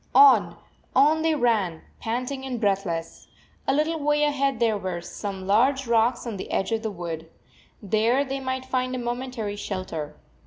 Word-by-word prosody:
On, 425 - +7 0.4
on 300 +4 +5
they 320 -1 +2
ran, 215 - +1 0.2
panting 250 +4 -3
and 255 -3 -3
breathless. 195 -6 -1 0.4
A 270 - +3
little 315 +2 +1
way 295 0 +2
ahead 275 -4 +1
there 230 -2 +3
were 185 -3 -3
some 190 +2 -6
large 260 +7 +3
rocks 235 +1 +2
on 225 -4 -4
the - - -6
edge 195 - 0
of 225 -1 0
the 220 - -2
wood. 165 -4 -6 0.5
There 225 +7 +2
they 270 0 -3
might 260 0 -3
find 255 0 -1
a - - -2
momentary 240 -3 -3
shelter. 175 -7 -5
235 Hz, 165 wpm, -25 LUFS, 200-265 Hz, 0.5 s, On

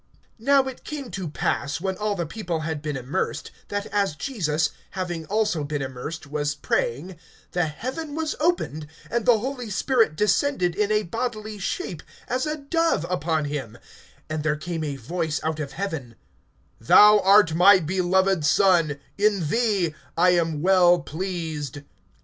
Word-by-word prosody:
(21)Now 275 +2 +4
it 260 - -7
came 285 -5 -6
to 185 -5 -4
pass, 140 0 -1
when 190 +1 -2
all 210 +1 -1
the 170 -3 -2
people 170 -2 -4
had 155 -1 -3
been 150 -2 -3
immersed, 135 +9 -3 0.2
that 205 0 -3
as 200 -7 +1
Jesus, 160 - -1 0.3
having 175 -4 -3
also 210 -6 0
been 145 -1 -3
immersed, 135 +5 -6
was 145 0 -2
praying, 150 +4 -2 0.3
the 175 -2 +1
heaven 265 - -5
was 315 -1 -2
opened, 300 - 0 0.2
(22)and 235 -1 0
the 240 -2 +6
Holy 250 0 -4
Spirit 225 - +2
descended 210 - +1
in 210 +3 0
a 215 0 +2
bodily 215 +1 -4
shape 175 -3 -3 0.3
as 255 +4 -1
a 305 0 -2
dove 325 - 0
upon 160 -3 0
him; 135 -6 -5 0.5
and 155 0 -3
there 150 0 +1
came 165 +1 -4
a 145 -2 -3
voice 155 +4 -2
out 160 0 -2
of 140 -3 -5
heaven: 160 - -4 0.6
Thou 210 - +7
art 195 -3 +5
my 185 +4 +7
beloved 185 +1 +1
Son; 165 -2 +3 0.2
in 200 -7 +2
thee 205 -8 +1 0.2
I 180 +2 +5
am 165 -3 0
well 180 -2 +5
pleased. 160 -5 -5
180 Hz, 155 wpm, -24 LUFS, 155-210 Hz, 0.6 s, Thou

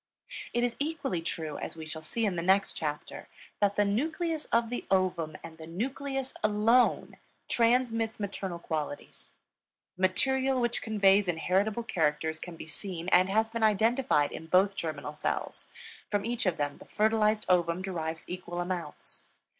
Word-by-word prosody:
It 240 - +1
is 245 -1 0
equally 285 - -1
true, 160 -2 -3
as - - -5
we 160 -1 -7
shall 160 0 -7
see 225 +8 -1
in 195 -4 0
the 170 - -1
next 190 +3 +3
chapter, 150 -2 -4 0.3
that 205 -1 +2
the 205 - +3
nucleus 315 - -1
of 230 0 +1
the 245 - -3
ovum 180 -5 +1
and 165 0 -10
the 160 - -9
nucleus 270 +8 -3
alone 215 +4 +3 0.3
transmits 230 -2 +2
maternal 190 -3 -3
qualities. 155 -4 -5 0.7
The - - -9
material 265 +7 +3
which 240 -1 0
conveys 200 -2 +4
inheritable 190 +6 +1
characters 160 -4 0
can 175 0 -7
be - - -8
seen 175 +2 -5
and 185 0 +5
has 220 +3 +2
been 230 0 -3
identified 220 - +3
in 160 - -7
both 190 +4 +4
germinal 155 -5 -4
cells; 150 - -3 0.4
from 205 -1 0
each 240 -2 -1
of 175 - +1
them 145 -1 -2
the - - -12
fertilized 215 0 +2
ovum 175 0 +2
derives 165 -4 -3
equal 175 -1 -5
amounts. 175 -4 -5
195 Hz, 160 wpm, -30 LUFS, 165-230 Hz, 0.7 s, and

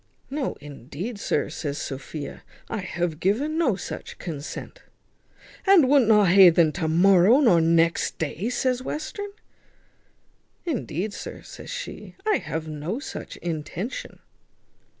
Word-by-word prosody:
"No, 280 -1 -2
indeed, 150 - -7
sir," 150 - 0
says 145 -3 -4
Sophia, 140 +2 -6 0.3
"I 225 - -2
have 175 -4 -3
given 240 - +1
no 305 - +2
such 185 - -7
consent." 160 - -7 0.9
"And 375 -8 +7
wunt 270 -4 +5
not 210 -4 +5
ha 190 +1 +9
un 170 - +6
then 165 -2 +4
to 165 0 -2
morrow, 190 - +6
nor 195 - +5
next 165 +1 +2
day?" 165 +7 -2
says 255 0 0
Western. 310 +9 -4 1.4
"Indeed, 215 - -2
sir," - - -8
says - - -11
she, - - -7
"I 430 -2 +3
have 160 0 -4
no 155 +7 -4
such - - -7
intention." 170 - -4
185 Hz, 130 wpm, -25 LUFS, 160-255 Hz, 1.4 s, ha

